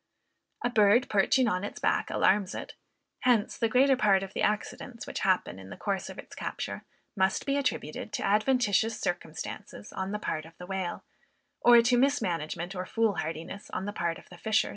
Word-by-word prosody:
A 245 - +2
bird 215 +3 +4
perching 215 +5 +4
on 185 -3 0
its 205 - -5
back - - +1
alarms 200 -1 +2
it; - - -6 0.5
hence, 240 -5 +2
the 230 - 0
greater 265 +3 +5
part 195 -5 +3
of 195 0 -8
the - - -2
accidents 230 +3 -2
which - - -4
happen 185 - +1
in 95 0 -11
the - - -8
course 195 -2 -2
of - - -9
its - - -10
capture, - - -5 0.3
must 190 -1 +1
be 275 - +1
attributed 260 - -2
to - - -1
adventitious 225 0 +2
circumstances 175 +4 -5
on 190 +1 -3
the 210 - -1
part 155 -6 -3
of 165 - -18
the 180 - -8
whale, 190 -2 -3 0.6
or 240 -1 +7
to 245 +1 +3
mismanagement 180 - 0
or 185 -1 -4
foolhardiness 195 -4 -2
on 190 - -4
the 205 - -4
part 170 -4 -1
of - - -15
the 175 - -13
fishers. 220 0 +2
205 Hz, 185 wpm, -29 LUFS, 180-230 Hz, 0.6 s, or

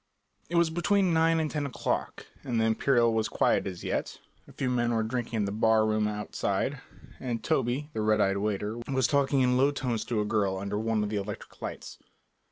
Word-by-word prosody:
It 175 - -3
was 170 -1 +3
between 180 +2 +2
nine 165 0 +3
and 155 -2 -1
ten 145 -2 -2
o'clock, 130 - -3 0.2
and 120 -3 -1
the 110 - +3
Imperial 115 +1 +3
was 110 -1 0
quiet - - +2
as 90 -3 -6
yet; - - -3 0.3
a - - -14
few 130 - -3
men 120 -1 +1
were 115 -1 +1
drinking 120 0 -3
in 105 - +1
the 100 - -2
barroom 110 0 +2
outside, 105 +4 -2 0.4
and 120 -3 -3
Toby, 135 +6 0
the 110 - -2
red 110 0 +2
eyed 100 -1 +2
waiter, 105 +2 -2
was 130 -2 +2
talking 140 +1 +2
in 125 0 +3
low 135 +2 +4
tones 125 -6 -2
to 115 - -1
a 105 - 0
girl 100 -3 0
under 100 +2 -3
one 110 -1 0
of 105 - -2
the 105 - -1
electric 100 +1 -7
lights. - - -7
115 Hz, 205 wpm, -28 LUFS, 105-135 Hz, 0.4 s, low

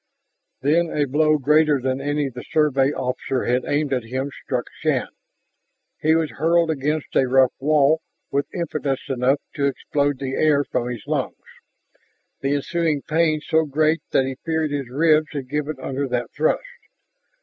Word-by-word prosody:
Then 165 +5 +2
a 150 -1 +1
blow 155 +3 +3
greater 150 +1 +3
than 130 +1 -2
any 145 0 0
the 125 -2 -8
Survey 140 -3 +2
officer 130 -1 -2
had 125 +1 +1
aimed 145 -1 0
at 125 -3 -1
him 130 +4 -3
struck 125 -3 -2
Shann. - - 0 0.9
He 160 +1 +3
was 160 -2 0
hurled 165 +2 +2
against 150 +1 -2
a 130 - +4
rough 130 0 +4
wall 150 +2 +3 0.3
with 140 +1 0
impetus 150 -6 -2
enough 130 +1 +2 0.2
to 140 -1 0
explode 140 +1 -1
the 135 0 -4
air 145 -1 +3
from 125 -2 -2
his 120 -3 -6
lungs, - - -2 1.0
the 140 +1 0
ensuing 155 0 -1
pain 155 -1 +1
so 160 +1 +1
great 155 +3 +1
that 135 - +2
he 130 -1 -4
feared 160 -2 -1
his 140 -4 -3
ribs 155 +3 +2
had 140 -3 -4
given 150 +2 -2
under 135 +1 -3
that 125 -2 -2
thrust. 155 - +1
145 Hz, 160 wpm, -22 LUFS, 135-155 Hz, 1.0 s, a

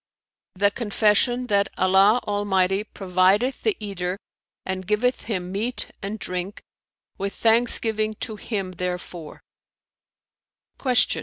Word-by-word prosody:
"The 200 +2 +3
confession 230 +3 +1
that 200 -3 +2
Allah 195 +5 +4
Almighty 200 -1 +1
provideth 195 +5 +1
the 435 -4 0
eater 190 -3 -4 0.5
and 190 -1 -4
giveth 225 +5 0
him 185 -5 -3
meat 220 +6 -3
and 200 +3 -4
drink, 185 0 -4 0.6
with 200 +1 -3
thanksgiving 225 -1 +3
to 220 0 -5
Him 200 -3 -4
therefor." 180 -2 -5
200 Hz, 100 wpm, -24 LUFS, 185-220 Hz, 0.6 s, Allah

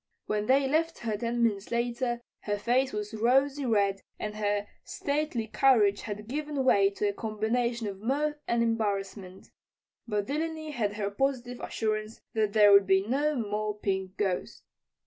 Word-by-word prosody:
When 210 0 -1
they 270 +1 +4
left 325 +4 +1
her 220 -2 0
ten 235 +2 -1
minutes 205 -3 0
later 240 0 -1 0.2
her 205 -1 0
face 255 +5 +1
was 210 0 -4
rosy 265 +5 +2
red 200 -3 +2 0.2
and 210 0 -4
her 205 -1 0 0.2
stately 285 -5 -2
carriage 220 -4 +3
had 210 -1 -6
given 295 +1 -2
way 200 -6 +5
to 205 +1 -2
a - - -3
combination 230 +2 -1
of 195 -1 -5
mirth 295 +5 0
and 235 0 +2
embarrassment. 200 -4 -3 0.6
But 210 -2 -1
Delany 315 +2 -3
had 220 -7 -1
her 205 -1 -2
positive 245 +1 -1
assurance 215 0 -3
that 215 -2 0
there 210 -2 +7
would 200 -1 +7
be 190 0 +3
no 290 +6 +1
more 210 -2 -2
Pink 190 -2 -2
Ghost. 190 -3 -2
220 Hz, 160 wpm, -29 LUFS, 205-260 Hz, 0.6 s, there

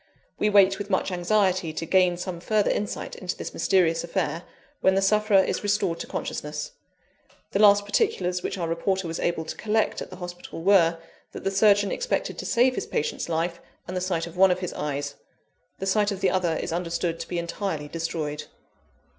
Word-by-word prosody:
We 210 - +3
wait 195 -2 +5
with 205 0 -5
much 190 0 0
anxiety 185 -1 +1
to 165 - -4
gain 180 0 +3
some 180 -1 -5
further 210 +3 +1
insight 205 - -3
into 185 -1 -4
this - - -6
mysterious 170 -4 +2
affair, 170 -2 -2 0.3
when 190 0 +3
the 195 - +3
sufferer 210 +1 +4
is 190 - +2
restored 205 -4 0
to - - -5
consciousness. 150 0 -4 0.8
The 195 - 0
last 205 -1 +6
particulars 205 - 0
which - - -3
our 170 -2 -2
reporter 180 +3 -1
was 165 - -4
able 165 -2 -1
to - - -5
collect 220 0 0
at - - -6
the 185 - -9
hospital 175 -2 -8
were, 170 -4 +5 0.4
that - - -8
the 195 - 0
surgeon 205 0 +4
expected - - -2
to - - -4
save 255 +1 +3
his - - -4
patient's 465 - -2
life, 170 +1 -1 0.3
and 185 - -5
the 180 - -1
sight 175 -3 -1
of 170 0 -10
one 190 +1 +6
of 180 0 0
his 180 - -4
eyes. 145 -1 -3 0.6
The 195 - -4
sight 205 +2 +2
of 195 - -4
the 190 - +3
other 175 -3 +1
is - - -3
understood 170 -1 -2
to 165 - -5
be 175 - -3
entirely 170 -2 -3
destroyed." 155 -2 -4
185 Hz, 195 wpm, -25 LUFS, 170-200 Hz, 0.8 s, last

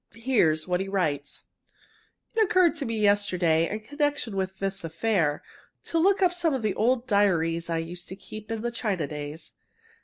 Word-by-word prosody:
Here's 215 -11 +2
what 180 0 0
he 195 - -3
writes: 150 -8 -2 0.9
"It 450 - +3
occurred 370 -6 +4
to 285 - -2
me 230 -1 -2
yesterday, 180 -6 +2
in 215 +1 -4
connection 290 -3 -2
with 190 0 -2
this 195 0 -2
affair, 165 -2 0 0.4
to 330 - -1
look 385 +3 +3
up 355 -1 +4
some 335 -5 +1
of 255 - -3
the 210 -3 +1
old 245 +2 +1
diaries 170 -6 +2
I 165 - 0
used 170 +2 -6
to 190 - -7
keep 215 +2 -9
in 225 0 -3
the 240 - -1
China 205 -9 -1
days. 150 +2 -7
200 Hz, 180 wpm, -26 LUFS, 165-240 Hz, 0.9 s, occurred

